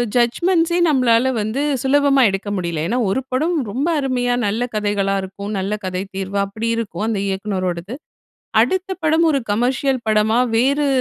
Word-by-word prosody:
ஜட்ஜ்மெண்ட்ஸே 335 +8 +2
நம்மளால 255 -2 +3
வந்து 220 +7 -2 0.2
சுலபமா 275 0 +3
எடுக்க 195 +1 -4
முடியல. 170 -3 -2
ஏன்னா, 250 +2 0
ஒரு 260 +7 0
படம் 315 +6 0
ரொம்ப 275 +9 -1
அருமையா 245 -2 0
நல்ல 225 +4 -1
கதைகளா 205 -2 0
இருக்கும். 200 +2 -7
நல்ல 195 +2 -2
கதை 185 +1 -2
தீர்வா 195 +1 -2
அப்படி 220 +3 -4
இருக்கும், 215 -1 -3
அந்த 205 -3 -1
இயக்குனரோடது. 190 +1 -3 0.7
அடுத்த 375 +10 0
படம் 320 +1 +3
ஒரு 275 -2 0
கமர்ஷியல் 255 +3 0
படமா 215 +2 +3 0.2
வேறு 280 +4 +2
230 Hz, 145 wpm, -19 LUFS, 200-270 Hz, 0.7 s, நம்மளால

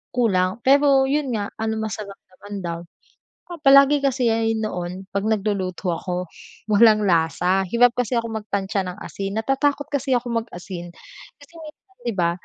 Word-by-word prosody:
kulang. 190 -3 +1
Pero 275 0 +5
yun 290 0 0
nga 205 -1 -3
ano 220 0 -1
masarap 210 -2 -5 0.2
naman 205 0 -9
daw. 170 -1 -4 0.7
Saka 345 - -8
palagi 275 +1 +7
kasi 255 -3 +1
yan 225 0 0
noon 180 -2 -4
'pag 200 +2 -1
nagluluto 195 -4 -1
ako, 180 +1 -4 0.4
walang 215 0 +5
lasa. 180 +2 +2
Hirap 235 +3 +4
kasi 245 0 0
akong 225 -1 -3
mag - - -33
tantsa 195 0 -1
ng 180 +2 -7
asin. 195 0 -5
Natatakot 280 +4 0
kasi 275 -1 0
akong 235 -2 -1
mag-asin 175 -2 -8 0.5
kasi 285 +3 -18
minsan 320 +5 -14
di 235 - -1
ba, 170 -1 +2
220 Hz, 160 wpm, -22 LUFS, 190-255 Hz, 0.7 s, palagi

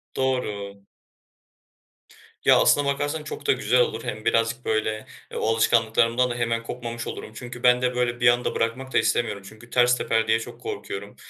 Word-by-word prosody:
Doğru. 105 -7 -2 1.7
Ya, - - +7
aslına 145 - +4
bakarsan 145 +2 -1
çok 150 -1 -8
da - - +5
güzel 125 -1 +2
olur, 115 -1 -1
hem 110 0 -6
birazcık 115 +2 +1
böyle, 110 0 -1 0.3
e, - - -9
o - - -1
alışkanlıklarımdan 115 +2 +2
da 120 - -3
hemen 115 -1 -1
kopmamış 120 0 -6
olurum. - - -7
Çünkü 125 +1 -9
ben 125 0 +5
de 125 0 0
böyle 120 -1 0
bir 120 - +4
anda 120 +1 +2
bırakmak 125 +4 -2
da - - +3
istemiyorum 105 -4 0
çünkü 110 +2 -16
ters 125 0 +3
teper 115 -2 0
diye 110 0 +3
çok 115 - -10
korkuyorum. 425 0 -6
120 Hz, 175 wpm, -24 LUFS, 115-125 Hz, 1.7 s, Ya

